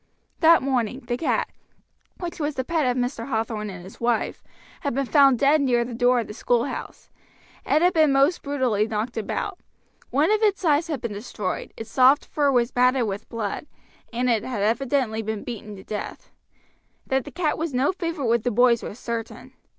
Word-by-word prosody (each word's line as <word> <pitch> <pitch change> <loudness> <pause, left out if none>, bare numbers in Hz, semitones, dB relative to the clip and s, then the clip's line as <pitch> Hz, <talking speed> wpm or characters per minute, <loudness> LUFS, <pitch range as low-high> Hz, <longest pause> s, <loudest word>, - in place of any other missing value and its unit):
That 330 -2 +6
morning 255 -2 -1
the 240 -1 -3
cat, 280 - -1 0.7
which 345 -2 -5
was 295 -1 -2
the 260 - -1
pet 315 -1 0
of 250 0 +1
Mr. 245 -1 -2
Hathorn 220 -3 -2
and 180 -2 -8
his 190 +5 -13
wife, 235 -1 0 0.4
had 280 -5 -2
been 275 0 0
found 275 -2 +5
dead 285 +4 +4
near 240 -3 +2
the 240 - -7
door 245 +1 +3
of 230 - -2
the 210 - -8
schoolhouse. 240 +3 -2 0.6
It 310 - +3
had 360 +1 +4
been 310 -4 +4
most 275 +6 +3
brutally 255 -7 0
knocked 220 +2 -3
about. 360 - -3 0.5
One 295 +8 +2
of 430 0 +2
its 400 -3 +1
eyes 310 +2 +3
had 300 -5 -3
been 235 -4 -4
destroyed, 205 -2 -4
its 225 0 -8
soft 260 +2 +5
fur 285 -2 +1
was 245 -1 +1
matted 250 0 +3
with 205 0 -5
blood, 225 +5 -4 0.4
and 245 +2 -1
it 230 -4 +2
had 230 -6 -3
evidently 235 0 0
been 220 -1 -4
beaten 215 -3 -7
to 190 - -12
death. 210 - -6 0.7
That 265 -1 0
the - - -9
cat 335 -4 0
was 325 -1 -2
no 260 +5 +2
favorite 335 -6 -3
with 235 0 +2
the 245 - 0
boys 240 0 +4
was 210 - -7
certain. 230 -2 -6
250 Hz, 195 wpm, -24 LUFS, 225-285 Hz, 0.7 s, That